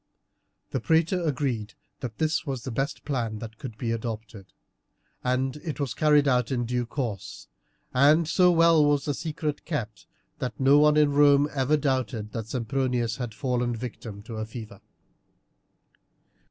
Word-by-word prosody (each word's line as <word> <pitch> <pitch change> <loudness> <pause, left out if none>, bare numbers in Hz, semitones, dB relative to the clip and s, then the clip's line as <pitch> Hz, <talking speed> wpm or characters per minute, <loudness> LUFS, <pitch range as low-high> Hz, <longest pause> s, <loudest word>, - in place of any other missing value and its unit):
The 130 - -1
praetor 165 +7 +2
agreed 130 -8 -2 0.2
that 115 -4 -6
this 155 -1 0
was 135 -4 -4
the 130 - -5
best 135 +5 -3
plan 120 -6 -2
that 110 +1 -9
could 130 -7 -7
be 115 0 -2
adopted, 110 -3 -5 0.8
and 130 +2 0
it 150 0 -6
was 135 -5 -1
carried 150 +1 +4
out 125 -3 +2
in 120 -2 0
due 120 0 -1
course, 120 -6 -5 0.5
and 150 +5 +5
so 180 +2 +4
well 165 -2 +5
was 145 -1 +2
the 145 - 0
secret 150 0 -4
kept 120 -10 -5 0.3
that 125 -4 -4
no 135 +2 +6
one 150 0 +5
in 150 -1 +4
Rome 145 0 +5
ever 140 +2 +2
doubted 130 -7 -1
that 110 -1 -5
Sempronius 120 -1 -1
had 120 -4 -5
fallen 125 0 -1
a - - -6
victim 110 -3 -7
to 110 -1 -5
fever. 110 -3 -9
130 Hz, 155 wpm, -26 LUFS, 115-145 Hz, 0.8 s, no